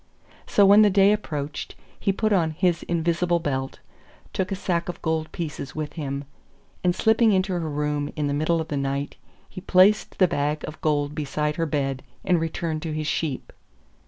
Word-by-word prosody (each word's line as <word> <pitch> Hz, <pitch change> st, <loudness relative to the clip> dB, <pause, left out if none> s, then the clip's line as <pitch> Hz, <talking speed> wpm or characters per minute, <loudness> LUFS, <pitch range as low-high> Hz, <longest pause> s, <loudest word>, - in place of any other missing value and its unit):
So 200 Hz, -, +5 dB
when 200 Hz, +2 st, +8 dB
the 210 Hz, -, +6 dB
day 195 Hz, +1 st, +5 dB
approached 150 Hz, -8 st, -3 dB, 0.2 s
he 195 Hz, -, +1 dB
put 215 Hz, +2 st, 0 dB
on 170 Hz, -5 st, +3 dB
his 175 Hz, -3 st, +2 dB
invisible 170 Hz, +1 st, 0 dB
belt, 135 Hz, -5 st, -3 dB, 0.6 s
took 190 Hz, +1 st, -2 dB
a -, -, 0 dB
sack 180 Hz, -3 st, -1 dB
of 175 Hz, -, -5 dB
gold 160 Hz, -1 st, -1 dB
pieces 150 Hz, -5 st, -5 dB
with 155 Hz, -1 st, -4 dB
him, 140 Hz, -3 st, -4 dB, 0.6 s
and 180 Hz, -1 st, +2 dB
slipping 220 Hz, 0 st, +4 dB
into 185 Hz, 0 st, +1 dB
her 175 Hz, -, 0 dB
room 150 Hz, 0 st, -2 dB
in 150 Hz, -, -1 dB
the 140 Hz, -, 0 dB
middle 155 Hz, +3 st, +1 dB
of 160 Hz, -, -4 dB
the 145 Hz, -, -2 dB
night, 140 Hz, +1 st, -2 dB, 0.3 s
he 185 Hz, -, -9 dB
placed 195 Hz, +3 st, +4 dB
the 185 Hz, -, +5 dB
bag 150 Hz, -1 st, -1 dB
of 155 Hz, -, -9 dB
gold 145 Hz, -1 st, 0 dB
beside 150 Hz, 0 st, -2 dB
her 165 Hz, -1 st, 0 dB
bed 135 Hz, -3 st, -1 dB, 0.2 s
and 180 Hz, -2 st, +3 dB
returned 160 Hz, -1 st, -2 dB
to 160 Hz, -1 st, -4 dB
his 155 Hz, 0 st, -3 dB
sheep. 150 Hz, -2 st, -2 dB
160 Hz, 190 wpm, -24 LUFS, 145-185 Hz, 0.6 s, when